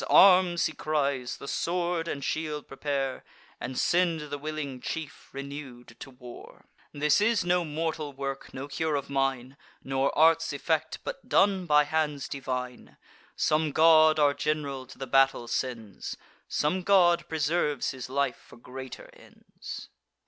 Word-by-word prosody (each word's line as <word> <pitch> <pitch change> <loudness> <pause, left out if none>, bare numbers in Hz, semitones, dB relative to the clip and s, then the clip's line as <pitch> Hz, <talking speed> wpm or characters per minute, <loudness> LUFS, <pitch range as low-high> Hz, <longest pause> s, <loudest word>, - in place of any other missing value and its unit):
arms!" 180 -3 +6
he 160 - -1
cries; 140 -6 -1
"the 140 - -9
sword 170 +1 -1
and 140 -4 -4
shield 155 -1 -3
prepare, 135 -1 -3 0.4
And 125 +1 -5
send 165 -4 +1
the 145 - -3
willing 145 -4 -5
chief, 150 -2 -6
renew'd, 135 -4 -8
to - - -9
war. 125 -2 -13 0.3
This 150 +5 +2
is 215 -3 +2
no 180 0 +2
mortal 155 -1 -3
work, 135 0 -5
no 135 +1 -6
cure 155 +2 -1
of 140 0 -4
mine, 135 -1 -1 0.3
Nor 135 +1 0
art's 160 0 +4
effect, 155 +2 -1
but - - -7
done 195 -2 +3
by 150 -1 +5
hands 150 -2 -1
divine. 125 -2 -5 0.4
Some 155 -1 +1
god 155 0 +6
our 145 -2 +4
general 140 -4 -2
to - - -13
the 135 - -5
battle 135 -2 +3
sends; 115 -6 -4 0.3
Some 165 +6 0
god 180 -2 +4
preserves 150 -2 0
his 130 -1 -7
life 135 -2 0
for - - -15
greater 130 +2 -9
ends." - - -11
145 Hz, 145 wpm, -28 LUFS, 135-160 Hz, 0.4 s, arms